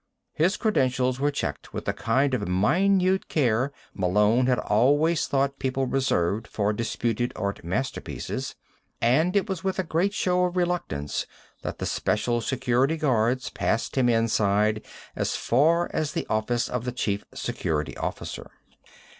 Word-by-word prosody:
His 180 Hz, +6 st, +2 dB
credentials 130 Hz, -, +1 dB
were 145 Hz, +1 st, +2 dB
checked 75 Hz, -, -4 dB
with -, -, -4 dB
the -, -, 0 dB
kind 135 Hz, 0 st, +1 dB
of 105 Hz, -6 st, -1 dB
minute 185 Hz, -, +2 dB
care 130 Hz, -2 st, +1 dB, 0.2 s
Malone 105 Hz, +6 st, +2 dB
had 125 Hz, -1 st, +3 dB
always 145 Hz, +9 st, +2 dB
thought 135 Hz, 0 st, 0 dB
people 135 Hz, 0 st, 0 dB
reserved 110 Hz, -6 st, 0 dB
for 105 Hz, 0 st, 0 dB
disputed 115 Hz, +1 st, -1 dB
art 100 Hz, -3 st, -3 dB
masterpieces, 95 Hz, +11 st, -3 dB, 0.4 s
and 155 Hz, -, +3 dB
it 200 Hz, +1 st, +2 dB
was 190 Hz, -4 st, -4 dB
with 190 Hz, -1 st, -1 dB
a 190 Hz, -, +1 dB
great 175 Hz, +5 st, 0 dB
show 180 Hz, -2 st, +2 dB
of 180 Hz, 0 st, -3 dB
reluctance 175 Hz, -, -1 dB, 0.3 s
that -, -, -5 dB
the -, -, -3 dB
Special 120 Hz, +3 st, 0 dB
Security 130 Hz, +5 st, +1 dB
guards 130 Hz, -4 st, +1 dB
passed 115 Hz, -, -1 dB
him 130 Hz, -2 st, +3 dB
inside 110 Hz, -2 st, +2 dB, 0.3 s
as -, -, -1 dB
far 165 Hz, +8 st, +3 dB
as 155 Hz, -1 st, -1 dB
the -, -, -2 dB
office 110 Hz, +2 st, 0 dB
of 125 Hz, -2 st, -3 dB
the 125 Hz, -, -2 dB
Chief 105 Hz, -5 st, -2 dB
Security 75 Hz, 0 st, -2 dB
Officer. -, -, -5 dB
125 Hz, 145 wpm, -26 LUFS, 110-155 Hz, 0.4 s, had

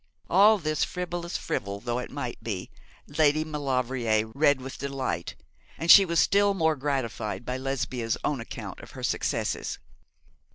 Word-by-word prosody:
All 205 Hz, +4 st, +7 dB
this, 155 Hz, -4 st, -1 dB
frivolous 175 Hz, -1 st, -3 dB
fribble 100 Hz, 0 st, -3 dB
though 120 Hz, +2 st, -2 dB
it 125 Hz, -, -6 dB
might 135 Hz, -4 st, -5 dB
be, 100 Hz, -5 st, -4 dB, 0.3 s
Lady 150 Hz, +1 st, +2 dB
Maulevrier 130 Hz, -7 st, 0 dB
read 145 Hz, -1 st, +3 dB
with 130 Hz, +1 st, -8 dB
delight, 135 Hz, -11 st, -3 dB, 0.4 s
and 165 Hz, +1 st, +4 dB
she 195 Hz, -, +10 dB
was 170 Hz, -2 st, +1 dB
still 200 Hz, 0 st, +4 dB
more 160 Hz, -3 st, +2 dB
gratified 120 Hz, -7 st, -3 dB
by 125 Hz, +1 st, -2 dB
Lesbia's 130 Hz, -3 st, -2 dB
own 140 Hz, -5 st, -1 dB
account 115 Hz, -, -7 dB
of -, -, -12 dB
her -, -, -7 dB
successes. -, -, -1 dB
135 Hz, 150 wpm, -27 LUFS, 120-160 Hz, 0.4 s, she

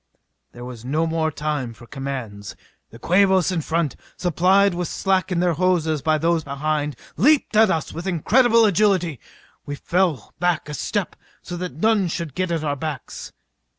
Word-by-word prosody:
_" -, -, -49 dB
There 120 Hz, 0 st, -9 dB
was 120 Hz, -3 st, -9 dB
no 150 Hz, +6 st, 0 dB
more 160 Hz, -1 st, 0 dB
time 150 Hz, -5 st, -3 dB
for 120 Hz, -, -14 dB
commands. 125 Hz, -7 st, -6 dB, 0.3 s
The 115 Hz, -, -13 dB
Quabos 190 Hz, +3 st, +3 dB
in 175 Hz, -3 st, -1 dB
front, 160 Hz, -2 st, -1 dB, 0.2 s
supplied 185 Hz, +3 st, +3 dB
with 175 Hz, 0 st, -2 dB
slack 190 Hz, +2 st, 0 dB
in 175 Hz, -1 st, +1 dB
their 175 Hz, -1 st, +2 dB
hoses 160 Hz, -3 st, +1 dB
by 155 Hz, +2 st, +2 dB
those 165 Hz, +1 st, +1 dB
behind, 145 Hz, +1 st, -2 dB, 0.2 s
leaped 290 Hz, -2 st, +3 dB
at 220 Hz, -1 st, +6 dB
us 160 Hz, -4 st, -1 dB
with 170 Hz, +4 st, -6 dB
incredible 230 Hz, -, +4 dB
agility. 185 Hz, -, +2 dB, 0.4 s
We 145 Hz, -, -5 dB
fell 170 Hz, -, -1 dB
back 175 Hz, -4 st, 0 dB
a 150 Hz, -, -6 dB
step 200 Hz, +5 st, -2 dB, 0.3 s
so 175 Hz, -, -6 dB
that 180 Hz, -3 st, -5 dB
none 210 Hz, +2 st, +2 dB
should 165 Hz, -3 st, -4 dB
get 185 Hz, +2 st, -1 dB
at 165 Hz, -2 st, -1 dB
our 145 Hz, -2 st, -1 dB
backs. 145 Hz, -2 st, -6 dB
165 Hz, 175 wpm, -22 LUFS, 145-185 Hz, 0.4 s, at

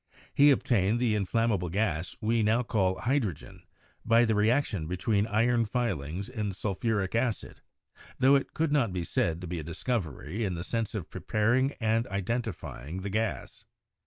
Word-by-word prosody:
He 145 Hz, +1 st, +6 dB
obtained 115 Hz, -5 st, +2 dB
the 120 Hz, -3 st, +2 dB
in 100 Hz, -3 st, 0 dB
flammable 105 Hz, -6 st, 0 dB
gas 90 Hz, -4 st, -1 dB
we 115 Hz, +1 st, +2 dB
now 110 Hz, +3 st, +2 dB
call 95 Hz, -5 st, 0 dB
hydrogen 120 Hz, -, -2 dB, 0.4 s
by 115 Hz, +1 st, +4 dB
the 110 Hz, -, +1 dB
reaction 105 Hz, -, +1 dB
be 90 Hz, +2 st, -3 dB
tween 105 Hz, +2 st, +1 dB
iron 115 Hz, +2 st, +2 dB
filings 100 Hz, -, -2 dB
and 105 Hz, -6 st, -3 dB
sulphuric 100 Hz, 0 st, -1 dB
acid, 115 Hz, -2 st, -2 dB, 0.6 s
tho 135 Hz, +2 st, +5 dB
it 140 Hz, -, +1 dB
could 160 Hz, -1 st, 0 dB
not 135 Hz, -8 st, +2 dB
be 90 Hz, -1 st, -2 dB
said 85 Hz, 0 st, -1 dB
to 90 Hz, -, -6 dB
be 85 Hz, 0 st, -3 dB
a -, -, -5 dB
discovery 95 Hz, -, -3 dB
in 95 Hz, -4 st, -1 dB
the 85 Hz, -, -4 dB
sense 115 Hz, +1 st, -2 dB
of 95 Hz, -6 st, -5 dB
preparing 120 Hz, +6 st, +1 dB
and 110 Hz, 0 st, 0 dB
iden 100 Hz, +5 st, -1 dB
tifying 90 Hz, -, -7 dB
the 100 Hz, -, -4 dB
gas. 110 Hz, +1 st, -3 dB
110 Hz, 170 wpm, -29 LUFS, 95-115 Hz, 0.6 s, He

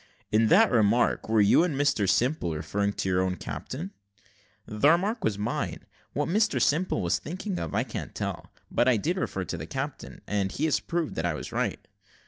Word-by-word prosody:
"In 110 Hz, +1 st, +4 dB
that 220 Hz, -, +5 dB
remark, 115 Hz, 0 st, +2 dB
were 110 Hz, -1 st, +4 dB
you 100 Hz, +10 st, +5 dB
and 170 Hz, -5 st, -1 dB
Mr 135 Hz, -9 st, +2 dB
Simple 120 Hz, -, +1 dB
referring 100 Hz, +6 st, -1 dB
to -, -, -3 dB
your 90 Hz, -1 st, +2 dB
own 95 Hz, 0 st, 0 dB
captain?" 155 Hz, -, -6 dB, 0.7 s
"The 110 Hz, +7 st, +2 dB
remark 200 Hz, +8 st, +2 dB
was 105 Hz, -2 st, 0 dB
mine: 105 Hz, -, -3 dB, 0.3 s
what 145 Hz, -, -1 dB
Mr 205 Hz, -5 st, +2 dB
Simple 150 Hz, -, +1 dB
was 90 Hz, +1 st, +1 dB
thinking 185 Hz, +3 st, -4 dB
of 80 Hz, -, -4 dB
I -, -, +2 dB
can't -, -, -7 dB
tell; -, -, -4 dB, 0.2 s
but -, -, +2 dB
I 125 Hz, -3 st, +4 dB
did 170 Hz, -, -1 dB
refer 95 Hz, -, -2 dB
to 90 Hz, -, -4 dB
the 80 Hz, -1 st, -7 dB
captain, 135 Hz, -, -5 dB
and 100 Hz, -2 st, -1 dB
he 150 Hz, -, -1 dB
has 155 Hz, -, +2 dB
proved 170 Hz, -2 st, -2 dB
that 80 Hz, -, -1 dB
I 75 Hz, -, -1 dB
was -, -, -7 dB
right." -, -, -2 dB
120 Hz, 200 wpm, -27 LUFS, 100-160 Hz, 0.7 s, that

